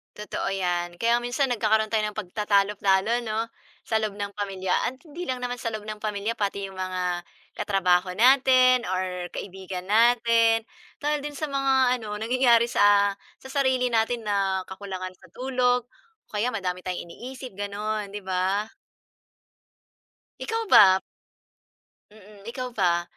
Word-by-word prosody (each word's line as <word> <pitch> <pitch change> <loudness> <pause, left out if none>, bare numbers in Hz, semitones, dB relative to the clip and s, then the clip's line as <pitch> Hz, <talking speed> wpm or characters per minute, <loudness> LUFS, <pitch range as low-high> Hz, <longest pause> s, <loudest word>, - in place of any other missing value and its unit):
Totoo 210 0 -4
'yan. 175 -2 -1
Kaya 235 +5 +2
minsan 245 +2 -1
nagkakaroon 220 -1 +1
tayo 220 -1 +2
ng 210 - -7
pagtatalo-talo 205 +2 +1
'no 225 +1 -2 0.4
sa 220 -1 +2
loob 215 -2 -3
ng 200 0 -4
pamilya 190 -3 -1
at 260 - -4
hindi 335 +3 -8
lang 255 -1 -2
naman 245 0 -2
sa - - -4
loob 215 -1 -5
ng 215 0 -5
pamilya, 210 +2 -2
pati 200 -1 -2
'yong 190 - -12
mga 180 -1 -2 0.3
katrabaho 185 -3 +2
natin 255 +1 +5
or 185 -1 -2
kaibigan 190 -1 -6
natin. 230 +1 +4 0.4
Dahil 295 +1 0
din 295 - -5
sa 305 +1 -3
mga 265 -2 +2
ano, 210 -2 -6
nangyayari 235 0 +3
sa 205 -2 +4 0.3
sa 265 - -11
sarili 260 -2 +2
natin 230 +1 +1
na 195 -2 +1
kakulangan 190 -1 -6
sa 185 - -18
tulog 250 -1 +1
o 450 - -33
kaya 220 +4 0
madami 180 -4 -2
tayong 180 -1 -4
iniisip 255 +7 -9
gano'n, 205 0 -3
'di 205 - -6
ba? 190 +3 0 1.7
Ikaw 450 0 -2
ba? 190 -1 +7 1.1
Mm, 210 0 -16
ikaw 250 +1 -5
ba? 175 -6 +1
215 Hz, 145 wpm, -25 LUFS, 190-245 Hz, 1.7 s, ba